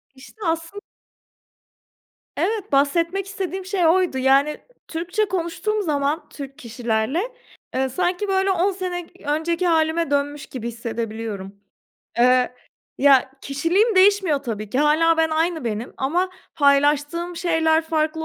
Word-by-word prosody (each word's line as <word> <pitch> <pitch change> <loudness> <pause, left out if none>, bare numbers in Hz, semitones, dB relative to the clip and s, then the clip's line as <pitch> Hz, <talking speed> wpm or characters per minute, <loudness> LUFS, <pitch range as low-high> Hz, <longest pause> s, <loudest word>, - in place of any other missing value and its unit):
İşte, 285 +11 -16
aslın 330 +5 -2 1.5
Evet, 430 -4 -1
bahsetmek 335 +7 +2
istediğim 385 -1 -5
şey 375 -3 0
oydu, 350 -5 +2
yani 275 +3 +3 0.3
Türkçe 355 +6 -1
konuştuğum 380 +4 -2
zaman 295 -1 -1
Türk 275 -1 -9
kişilerle, 235 +3 -1 0.5
eee, 265 0 +1
sanki 360 +7 -1
böyle 385 0 +2
10 365 -1 -1
k 355 -5 -6
önceki 335 +3 -1
hâlime 320 -1 +1
dönmüş 285 0 -1
gibi 235 -3 -6
hissedebiliyorum. 225 -4 -5 0.6
Eee, 250 +1 +4 0.4
ya 270 -2 +5
kişiliğim 345 +11 +1
değişmiyor 380 -5 +4
tabii 215 -6 -5
ki, 255 - -1
hâlâ 315 +3 +4
ben 320 0 +2
aynı 320 -1 0
benim 225 +1 -4
ama 350 +8 0 0.2
paylaştığım 295 +4 +2
şeyler 325 -2 +2
farklı 320 0 -1
320 Hz, 120 wpm, -22 LUFS, 275-355 Hz, 1.5 s, ya